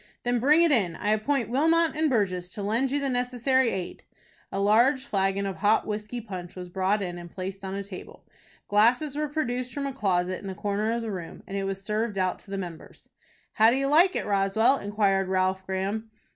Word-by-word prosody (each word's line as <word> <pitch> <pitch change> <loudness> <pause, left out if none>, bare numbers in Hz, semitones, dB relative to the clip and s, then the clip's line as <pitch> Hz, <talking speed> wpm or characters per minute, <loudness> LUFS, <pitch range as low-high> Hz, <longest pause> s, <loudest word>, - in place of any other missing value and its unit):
"Then 245 0 +1
bring 300 +7 +5
it 335 - +4
in. 195 - +2
I 205 +5 -1
appoint 235 +4 0
Wilmot 325 +5 +3
and 310 0 +2
Burgess 185 -7 0
to 205 - -5
lend 230 +6 +1
you 285 +2 0
the 280 - -1
necessary 250 0 +1
aid." 185 -4 -5 0.5
A 195 - -2
large 240 +7 +3
flagon 195 -3 0
of 195 -1 -4
hot 210 +2 +2
whiskey 210 +3 -4
punch 185 -6 -8
was 180 -1 -7
brought 190 +3 0
in 175 -1 -5
and 175 0 -9
placed 190 +2 -6
on 190 0 -4
a 200 - -3
table. 190 -2 -11 0.4
Glasses 245 +8 +3
were 300 0 -1
produced 255 -4 -2
from 280 +3 -4
a 275 - -3
closet 185 -6 0
in 200 - -8
the 190 - -5
corner 205 +3 -1
of 235 0 -2
the 225 - -3
room, 180 -4 -7
and 195 - -7
it 195 0 -1
was 195 0 -4
served 215 0 -2
out 185 -1 0
to - - -18
the 195 - -3
members. 175 -4 -9 0.4
"How 220 0 +5
do 240 - +2
you 275 - 0
like 335 +7 +4
it, - - -1
Roswell?" 210 +6 +2
inquired 200 -2 +1
Ralph 190 0 0
Graham. 195 +4 -2
210 Hz, 215 wpm, -26 LUFS, 195-250 Hz, 0.5 s, bring